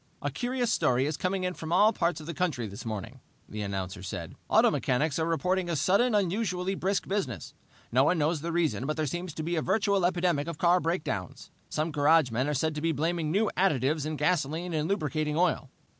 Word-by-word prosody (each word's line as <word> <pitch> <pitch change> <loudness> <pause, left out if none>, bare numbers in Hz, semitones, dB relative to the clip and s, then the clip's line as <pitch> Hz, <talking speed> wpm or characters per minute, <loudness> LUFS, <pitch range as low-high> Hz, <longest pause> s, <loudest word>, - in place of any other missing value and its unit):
"A - - -1
curious 245 -1 -1
story 125 +2 +2
is 150 +1 -1
coming 185 +3 -1
in 180 0 -1
from 160 -2 -7
all 205 +5 +5
parts 170 -3 0
of 155 - -9
the 170 - -5
country 150 -8 -1
this 100 +1 -8
morning," 110 +4 -5 0.3
the 105 - -6
announcer 95 -1 -4
said. 95 -3 -6 0.2
"Auto - - +5
mechanics 145 +5 0
are 160 - 0
reporting 180 +2 0
a 170 - 0
sudden, 200 - +3
unusually 190 -1 0
brisk 195 0 -1
business. 135 - -3 0.4
No 130 +3 +4
one 180 - +3
knows 155 0 +1
the 170 +2 -3
reason, 165 -6 0
but 155 - -2
there 155 - 0
seems 175 +5 -4
to 155 - -4
be 170 +2 -1
a - - +1
virtual 200 +1 +1
epidemic 175 -4 +1
of 170 -2 -5
car 175 +2 +4
breakdowns. 160 - -3 0.2
Some 155 +2 -1
garagemen 145 -4 +3
are 150 - 0
said 160 +4 0
to 150 - -4
be 165 +1 +1
blaming 160 +2 -1
new 205 +6 +1
additives 150 -4 +1
in 155 - -3
gasoline 165 +2 0
and 155 +1 -1
lubricating 155 -5 -1
oil. 165 -6 +1
160 Hz, 210 wpm, -28 LUFS, 145-180 Hz, 0.4 s, all